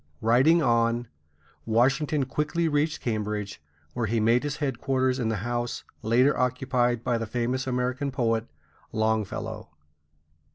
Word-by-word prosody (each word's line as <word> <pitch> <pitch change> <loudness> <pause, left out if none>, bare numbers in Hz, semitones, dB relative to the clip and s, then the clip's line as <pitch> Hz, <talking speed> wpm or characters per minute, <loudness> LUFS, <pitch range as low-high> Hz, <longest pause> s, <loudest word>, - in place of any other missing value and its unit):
Riding 135 +9 +4
on, 115 -1 +1 0.5
Washington 135 +5 +2
quickly 150 +5 -1
reached 150 0 0
Cambridge, 105 -4 -3 0.3
where 120 -2 -1
he 115 +2 0
made 115 +3 +3
his 145 0 -3
headquarters 130 -1 0
in 115 -3 0
the 110 - 0
house 120 +1 -2 0.2
later 125 +6 +3
occupied 125 -2 0
by 120 -2 0
the 115 - -3
famous 125 +3 -1
American 125 +2 -1
poet 115 -3 0 0.4
Longfellow. 110 -1 -2
120 Hz, 125 wpm, -26 LUFS, 115-135 Hz, 0.5 s, Riding